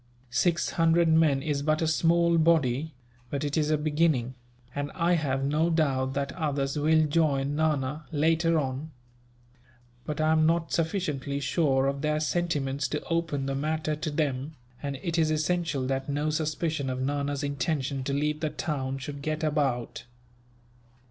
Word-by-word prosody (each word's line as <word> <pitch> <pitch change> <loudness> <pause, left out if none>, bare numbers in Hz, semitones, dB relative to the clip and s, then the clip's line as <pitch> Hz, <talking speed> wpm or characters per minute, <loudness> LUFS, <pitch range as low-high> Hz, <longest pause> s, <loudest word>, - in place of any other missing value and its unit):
Six 165 +8 +1
hundred 165 0 +3
men 155 -4 +3
is 145 -2 -1
but 155 +1 +1
a 160 - +1
small 170 +1 +3
body; 155 -3 +2 0.3
but 140 +2 -3
it 145 -1 -1
is 155 -2 +1
a 155 - +3
beginning, 150 -4 +1 0.4
and 145 0 -3
I 175 0 +2
have 135 -5 0
no 155 +4 +2
doubt 135 -5 +1
that 140 0 -1
others 140 -4 -2
will 155 +1 +3
join 145 -3 +1
Nana, 150 -1 0
later 165 +2 +2
on. 135 +1 -2 1.1
But 150 -1 -4
I 155 0 +3
am 155 0 +4
not 165 0 +1
sufficiently 155 -5 -1
sure 135 -2 +1
of 140 0 -1
their 150 0 +1
sentiments 145 -4 -1
to 150 +4 -3
open 165 -5 0
the 135 - -2
matter 155 +2 -1
to 155 +1 -3
them, 145 -1 -2 0.3
and 140 -1 -3
it 170 -1 0
is 160 -1 +3
essential 155 -3 0
that 135 +1 -2
no 145 +2 0
suspicion 155 -2 -1
of 130 0 -3
Nana's 140 +1 -1
intention 140 -1 -1
to 140 - -1
leave 150 +2 0
the 155 - -1
town 135 -3 -3
should 140 +1 -7
get 155 +2 -2
about. 140 -8 -1
150 Hz, 160 wpm, -27 LUFS, 140-160 Hz, 1.1 s, am